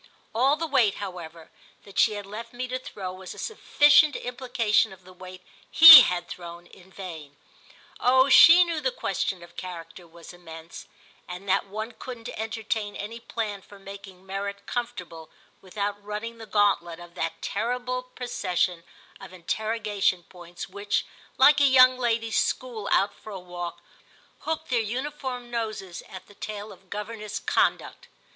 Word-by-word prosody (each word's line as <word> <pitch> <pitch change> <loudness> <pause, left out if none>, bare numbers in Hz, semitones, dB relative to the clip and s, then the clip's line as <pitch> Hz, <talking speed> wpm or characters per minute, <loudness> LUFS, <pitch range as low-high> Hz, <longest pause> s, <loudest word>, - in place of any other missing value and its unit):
All 260 +6 +3
the 330 - -3
weight, 255 -10 +2
however, 170 -5 -9 0.3
that 200 - -6
she 210 -2 +3
left 215 +4 -9
me 250 +1 -4
to 255 +1 -4
throw 190 -7 -7
was 185 0 -10
a - - -16
sufficient 295 -7 +4
implication 245 -4 0
of 190 -1 -15
the 185 +1 -15
weight 185 0 -12 0.3
he 325 -1 +12
had 175 -1 -1
thrown 170 0 -10
in 185 +1 -18
vain. 160 -7 -9 0.6
Oh 260 +2 +4
she 330 +6 +8
knew 335 -3 -3
the - - +1
question 190 - -3
of 170 0 -16
character 170 -1 -9
was 170 +1 -14
immense, 165 -2 -11 0.4
and 180 +3 -9
that 195 +1 +1
one 215 +3 -6
couldn't 240 0 -9
entertain 220 -1 -4
any 225 +3 -7
plan 215 -3 -5
for 200 - -16
making 195 -1 -12
merit 200 +1 -5
comfortable 180 -10 -6 0.3
without 205 +1 -4
running 215 +3 -6
the 225 - -10
gauntlet 195 -6 +1
of 175 0 -13
that 165 -2 -4
terrible 250 +1 -2
procession 190 -9 -3 0.4
of - - -11
interrogation 205 0 -1
points 175 0 -10
which, 200 +2 -2 0.3
like 285 +2 +6
a - - +6
young 255 -1 +6
ladies' 230 -2 0
school 235 -5 -3
out 200 - +2
for - - -14
a 195 - -6
walk, 175 -1 -8 0.6
hooked 320 -3 -4
their 240 -2 +2
uniform 250 +1 -5
noses 215 -6 -5
at 185 -1 -10
the 205 - -18
tail 210 +1 -7
of 190 - -17
governess 210 0 -6
Conduct. - - -1
205 Hz, 155 wpm, -25 LUFS, 185-240 Hz, 0.6 s, he